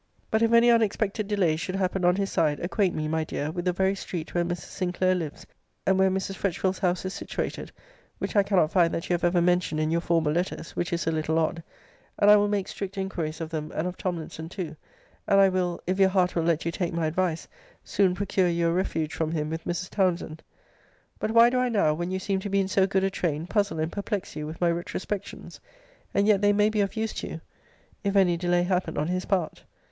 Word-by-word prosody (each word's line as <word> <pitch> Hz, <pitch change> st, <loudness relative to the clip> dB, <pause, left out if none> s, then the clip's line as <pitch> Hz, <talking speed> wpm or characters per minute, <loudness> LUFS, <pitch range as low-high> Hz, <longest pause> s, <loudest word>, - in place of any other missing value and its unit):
[But 220 Hz, -, +2 dB
if 230 Hz, 0 st, +3 dB
any 235 Hz, +1 st, +6 dB
unexpected 215 Hz, -2 st, +1 dB
delays 180 Hz, -7 st, +1 dB
should 185 Hz, +2 st, -3 dB
happen 190 Hz, -1 st, -1 dB
on 180 Hz, 0 st, +4 dB
his 195 Hz, 0 st, -1 dB
side, 150 Hz, -2 st, +1 dB
acquaint 185 Hz, +1 st, 0 dB
me, 155 Hz, 0 st, -2 dB
my 160 Hz, +1 st, 0 dB
dear, 150 Hz, -1 st, -3 dB
with 175 Hz, +1 st, -4 dB
the 180 Hz, -, +3 dB
very 190 Hz, +2 st, +1 dB
street 175 Hz, -4 st, -6 dB
where 175 Hz, -, +2 dB
Mrs. 175 Hz, 0 st, -5 dB
Sinclair 185 Hz, 0 st, +1 dB
lives; 160 Hz, -5 st, -4 dB, 0.4 s
and 190 Hz, 0 st, +3 dB
where 190 Hz, 0 st, +5 dB
Mrs. 190 Hz, +1 st, -2 dB
Fretchville's 190 Hz, 0 st, -1 dB
house 180 Hz, -1 st, 0 dB
is 185 Hz, -, -3 dB
situated -, -, -4 dB, 0.5 s
(which -, -, -4 dB
I 205 Hz, -, +6 dB
cannot 190 Hz, -5 st, +2 dB
find 170 Hz, -3 st, +3 dB
that 165 Hz, -, -4 dB
you -, -, 0 dB
have 175 Hz, -, -1 dB
ever 175 Hz, 0 st, +3 dB
mentioned 180 Hz, -3 st, +1 dB
in 155 Hz, 0 st, 0 dB
your 170 Hz, +1 st, +1 dB
former 165 Hz, -3 st, +1 dB
letters 175 Hz, -1 st, -2 dB
which 175 Hz, +2 st, -2 dB
is 170 Hz, 0 st, -1 dB
a 165 Hz, -, +1 dB
little 160 Hz, 0 st, 0 dB
odd); 165 Hz, +1 st, 0 dB, 0.6 s
and 205 Hz, 0 st, +6 dB
I -, -, +9 dB
will 205 Hz, 0 st, +3 dB
make 205 Hz, -2 st, -1 dB
strict 195 Hz, 0 st, -6 dB
inquiries 170 Hz, -5 st, -3 dB
of 160 Hz, -, -5 dB
them, 155 Hz, -1 st, -4 dB
and 155 Hz, -, -1 dB
of 180 Hz, -, -5 dB
Tomlinson 165 Hz, -3 st, -5 dB
too; 170 Hz, -4 st, -5 dB, 0.5 s
and 195 Hz, -, +5 dB
I 195 Hz, -1 st, +6 dB
will 180 Hz, -2 st, -1 dB
(if 185 Hz, +2 st, -1 dB
your 190 Hz, -1 st, +6 dB
heart 185 Hz, -2 st, +1 dB
will 170 Hz, -, +2 dB
let 165 Hz, -2 st, +1 dB
you 170 Hz, -, 0 dB
take 170 Hz, 0 st, -2 dB
my 165 Hz, -1 st, 0 dB
advice) 165 Hz, +1 st, -1 dB, 0.4 s
soon 190 Hz, -2 st, +2 dB
procure 190 Hz, -1 st, +1 dB
you 170 Hz, 0 st, +1 dB
a -, -, +1 dB
refuge 165 Hz, -4 st, -1 dB
from 160 Hz, -1 st, -1 dB
him 155 Hz, -2 st, -2 dB
with 160 Hz, 0 st, -5 dB
Mrs. 175 Hz, +2 st, -3 dB
Townsend.] 175 Hz, -5 st, 0 dB, 0.8 s
[But -, -, -1 dB
why 230 Hz, +2 st, +6 dB
do 255 Hz, -, +1 dB
I 250 Hz, 0 st, +1 dB
now, 200 Hz, -9 st, +2 dB
when 175 Hz, +3 st, -3 dB
you 190 Hz, -, -1 dB
seem 190 Hz, 0 st, -1 dB
to 200 Hz, -, -5 dB
be 200 Hz, 0 st, +2 dB
in 195 Hz, -, +1 dB
so 190 Hz, 0 st, +2 dB
good 195 Hz, -1 st, +1 dB
a 195 Hz, -, +1 dB
train, 160 Hz, -4 st, -2 dB
puzzle 200 Hz, -2 st, 0 dB
and 160 Hz, +1 st, -1 dB
perplex 200 Hz, -1 st, -4 dB
you 150 Hz, -1 st, -4 dB
with 160 Hz, +1 st, -8 dB
my 175 Hz, -1 st, +3 dB
retrospections? 185 Hz, +3 st, -5 dB, 0.5 s
And 200 Hz, -, +2 dB
yet 205 Hz, -2 st, +4 dB
they 205 Hz, 0 st, +4 dB
may 210 Hz, +1 st, +3 dB
be 215 Hz, -1 st, 0 dB
of 195 Hz, -, -1 dB
use 220 Hz, 0 st, -2 dB
to -, -, -5 dB
you, -, -, -7 dB, 0.6 s
if 200 Hz, 0 st, -1 dB
any 185 Hz, -3 st, +4 dB
delay 175 Hz, 0 st, +1 dB
happen 180 Hz, 0 st, -1 dB
on 150 Hz, -, +1 dB
his 185 Hz, +1 st, -2 dB
part. 185 Hz, -5 st, -1 dB
180 Hz, 240 wpm, -26 LUFS, 165-195 Hz, 0.8 s, I